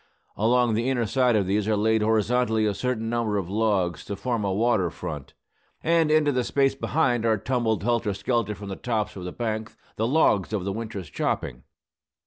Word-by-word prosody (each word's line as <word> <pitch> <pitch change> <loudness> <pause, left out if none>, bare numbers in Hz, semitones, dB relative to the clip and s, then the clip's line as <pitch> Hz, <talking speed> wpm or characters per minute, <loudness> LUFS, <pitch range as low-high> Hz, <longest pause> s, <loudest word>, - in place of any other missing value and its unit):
Along 120 +2 +2
the 115 +4 0
inner 120 -3 +1
side 125 +2 +2
of 100 -3 +2
these 100 +2 0
are 110 -1 +2
laid 110 +1 +2
horizontally 110 +1 +2
a 105 - +1
certain 115 0 -2
number 115 -3 0
of 95 -2 -3
logs, 100 -6 0
to 100 - -4
form 115 +2 -2
a 100 - 0
water 105 -3 +2
front; 75 -5 -7 0.5
and 165 -1 +3
into 155 -1 +4
the 125 -2 0
space 135 +2 +2
behind 135 -4 0
are 110 -1 +2
tumbled 115 -2 -1
helter 115 -3 0
skelter 105 0 -1
from 100 +1 -8
the 95 - -4
tops 110 -2 -2
of 90 -2 -7
the 90 - -4
bank 110 -1 -4 0.2
the 110 - +1
logs 115 - +2
of 100 -4 -1
the 100 - -2
winter's 105 -5 -5
chopping. - - -2
110 Hz, 195 wpm, -25 LUFS, 100-120 Hz, 0.5 s, into